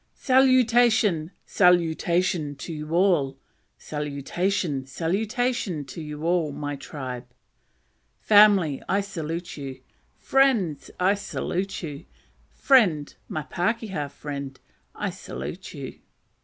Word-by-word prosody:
"Salutation! 240 - +4 0.2
salutation 170 -3 +2
to 150 +5 -7
you 150 0 -6
all! 170 -8 +2 0.4
salutation! 150 +2 -2
salutation 195 - -1
to 135 +5 -8
you, 155 +1 -1
my 145 0 -4
tribe! 130 -3 -7 0.9
family, 205 -9 +5
I 200 +1 +2
salute 170 -4 -5
you! 135 -2 -7 0.4
friends, 230 - +2
I 185 +2 +4
salute 195 -2 -3
you! 145 -3 -7 0.5
friend, 190 - +3
my 155 - -4
pakeha 185 -3 -2
friend, 140 -1 -7 0.4
I - - -2
salute - - -7
you." - - -8
170 Hz, 95 wpm, -25 LUFS, 145-200 Hz, 0.9 s, family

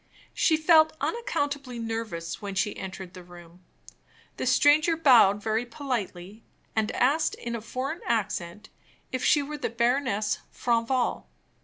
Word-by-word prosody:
She 315 - +3
felt 315 0 +5
unaccountably 285 - -2
nervous 225 -8 -4
when 200 -1 -5
she 205 +2 0
entered 190 -1 -8
the 185 - -10
room. 175 0 -15 0.7
The - - -2
stranger 300 +5 +4
bowed 225 -9 +5
very 220 +1 0
politely, 225 -6 -5 0.3
and 220 -1 +1
asked, 305 +5 +2
in 235 0 -5
a 230 - -5
foreign 260 +9 -4
accent, 210 -3 -2 0.4
if 255 -1 -3
she 290 - +4
were 300 +1 -6
the - - -2
Baroness 235 -2 0
Franval. 240 +1 0
235 Hz, 135 wpm, -27 LUFS, 205-285 Hz, 0.7 s, felt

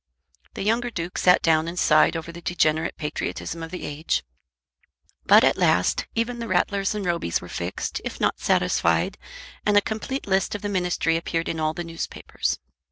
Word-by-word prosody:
The - - -3
younger 230 +4 +1
Duke 175 -5 -4
sat 180 0 +5
down 160 -1 +3
and 170 +1 -5
sighed 155 0 +4
over 165 +1 -6
the 170 +1 -10
degenerate 160 -2 +1
patriotism 155 +2 -4
of 165 - -6
the 180 +1 -6
age. 150 +2 -1 1.0
But - - +8
at - - +3
last 90 +1 +2
even 235 +1 -1
the 230 - -4
Rattlers 195 +2 +1
and 205 -2 -3
Robys 170 - 0
were - - -10
fixed, - - -4
if - - -5
not - - +1
satisfied, 85 0 +1 0.4
and 210 -1 +3
a - - +10
complete 220 +6 -4
list 190 +1 +1
of 210 - -6
the 205 - -1
ministry 180 -3 +1
appeared 165 0 -2
in 160 - -2
all 155 0 0
the 175 - -3
newspapers. 165 -1 -3
170 Hz, 180 wpm, -24 LUFS, 160-205 Hz, 1.0 s, a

